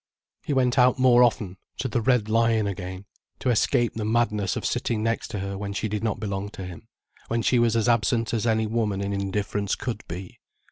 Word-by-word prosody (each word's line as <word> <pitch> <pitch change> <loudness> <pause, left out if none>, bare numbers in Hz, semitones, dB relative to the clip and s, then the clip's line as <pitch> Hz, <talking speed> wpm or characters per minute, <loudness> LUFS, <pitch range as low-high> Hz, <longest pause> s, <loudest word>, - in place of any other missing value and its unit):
He - - -4
went 130 -1 +2
out 125 +2 +5
more 125 -2 +5
often, 105 -6 +2 0.2
to 130 - -2
the 120 0 -1
"Red 125 -3 +2
Lion" 115 -1 +2
again, 95 -1 -5 0.3
to 125 - 0
escape 120 +1 +2
the 110 - -4
madness 105 -3 +1
of - - -4
sitting 110 -2 -1
next 115 0 -1
to - - -5
her 100 0 -4
when 100 0 -4
she 110 - -2
did 105 0 -3
not 110 -3 -1
belong 100 -1 -3
to 95 - -5
him, 90 -3 -10 0.4
when 115 0 -1
she 125 - +3
was 115 -1 +3
as 115 0 +2
absent 115 0 +2
as 115 0 0
any 110 -1 +2
woman 105 -3 -1
in 100 0 -2
indifference 100 +1 -1
could 115 -4 -4
be. 90 +2 -8
110 Hz, 215 wpm, -25 LUFS, 100-120 Hz, 0.4 s, out